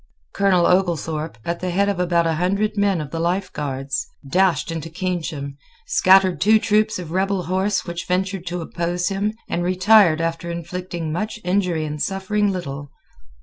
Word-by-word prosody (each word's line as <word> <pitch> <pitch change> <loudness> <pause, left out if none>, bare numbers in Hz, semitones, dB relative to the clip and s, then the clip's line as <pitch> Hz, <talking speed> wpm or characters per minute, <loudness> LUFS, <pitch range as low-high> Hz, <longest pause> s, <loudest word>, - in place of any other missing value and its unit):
Colonel 190 -3 +3
Oglethorpe, 165 -5 0
at 170 0 -2
the 185 - -3
head 200 +3 +1
of 200 -3 -1
about 170 -1 +2
a 165 - +1
hundred 200 +4 0
men 200 -3 +2
of 145 -2 -7
the 165 - -3
Life 180 +3 -1
Guards, 135 -1 -3 0.2
dashed 180 +2 +2
into 165 0 -5
Keynsham, 160 -5 -4 0.3
scattered 190 - +4
two 220 +2 +6
troops 215 0 +1
of 175 -3 -7
rebel 190 +1 0
horse 190 +4 0
which 170 -1 -5
ventured 185 0 -1
to 175 0 -3
oppose 175 +2 -2
him, 200 +2 -1
and 175 - -2
retired 185 -1 +5
after 165 +1 -2
inflicting 170 -1 -5
much 215 +6 -3
injury 180 -3 0
and 150 -1 -5
suffering 200 +1 0
little. 145 -6 -5
180 Hz, 165 wpm, -21 LUFS, 165-195 Hz, 0.3 s, two